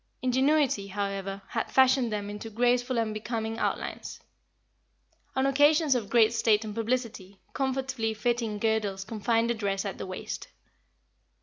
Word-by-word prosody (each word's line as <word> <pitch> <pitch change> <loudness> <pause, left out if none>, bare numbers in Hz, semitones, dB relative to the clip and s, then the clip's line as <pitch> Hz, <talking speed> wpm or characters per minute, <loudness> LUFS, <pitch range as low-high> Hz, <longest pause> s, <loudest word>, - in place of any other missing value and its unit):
Ingenuity, 260 -4 +2
however, 195 0 -4
had - - -3
fashioned 260 -2 +4
them 205 -1 -3
into 210 +2 -6
graceful 245 +2 +1
and 225 -2 0
becoming 225 +1 -3
outlines. - - -3 1.2
On 265 0 +2
occasions 290 +2 +4
of 230 -5 -2
great 230 -1 +4
state 220 -2 +2
and 210 - -5
publicity, 225 -4 -3
comfortably 260 -4 -1
fitting 230 -1 -1
girdles 205 -3 0
confined 230 +2 0
the - - +2
dress 200 -3 -2
at 195 - -5
the - - -5
waist. 185 - -6
225 Hz, 135 wpm, -28 LUFS, 205-250 Hz, 1.2 s, fashioned